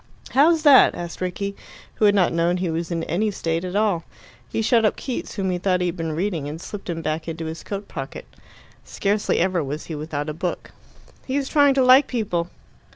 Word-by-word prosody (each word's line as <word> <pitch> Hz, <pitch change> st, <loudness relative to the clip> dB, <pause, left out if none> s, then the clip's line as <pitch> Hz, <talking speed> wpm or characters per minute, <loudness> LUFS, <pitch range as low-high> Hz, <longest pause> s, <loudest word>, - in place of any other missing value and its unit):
"How's 315 Hz, +4 st, +4 dB
that?" 285 Hz, -4 st, +7 dB
asked 175 Hz, +1 st, -7 dB
Rickie, 200 Hz, +2 st, -3 dB, 0.4 s
who 215 Hz, -, +1 dB
had 205 Hz, 0 st, +5 dB
not 185 Hz, -4 st, +3 dB
known 170 Hz, +2 st, +1 dB
he 180 Hz, -2 st, -1 dB
was 165 Hz, +1 st, -3 dB
in 165 Hz, -2 st, -2 dB
any 195 Hz, +8 st, 0 dB
state 165 Hz, -4 st, -2 dB
at 185 Hz, +1 st, -5 dB
all. 205 Hz, -6 st, +1 dB, 0.5 s
He 225 Hz, -, -1 dB
shut 230 Hz, +1 st, +3 dB
up 215 Hz, -, +2 dB
Keats, 255 Hz, -, -5 dB
whom 190 Hz, -2 st, -1 dB
he 180 Hz, -, -2 dB
thought 185 Hz, 0 st, +1 dB
he 180 Hz, -, 0 dB
had 175 Hz, 0 st, -2 dB
been 165 Hz, -3 st, -3 dB
reading, 165 Hz, -4 st, -2 dB
and 155 Hz, +2 st, -6 dB
slipped 200 Hz, +1 st, -8 dB
him 165 Hz, -1 st, -3 dB
back 155 Hz, +1 st, -2 dB
into 165 Hz, 0 st, -4 dB
his 160 Hz, +1 st, -6 dB
coat 200 Hz, 0 st, -5 dB
pocket. 135 Hz, 0 st, -7 dB, 0.6 s
Scarcely 205 Hz, +1 st, 0 dB
ever 180 Hz, -2 st, +1 dB
was 145 Hz, +3 st, -5 dB
he 165 Hz, -, -6 dB
without 150 Hz, -1 st, -4 dB
a 155 Hz, -, -3 dB
book. 175 Hz, +3 st, -4 dB, 0.6 s
"He's 275 Hz, +1 st, -1 dB
trying 285 Hz, -2 st, +4 dB
to 265 Hz, -, +4 dB
like 260 Hz, +2 st, +7 dB
people." 180 Hz, -8 st, -2 dB
180 Hz, 215 wpm, -23 LUFS, 165-210 Hz, 0.6 s, that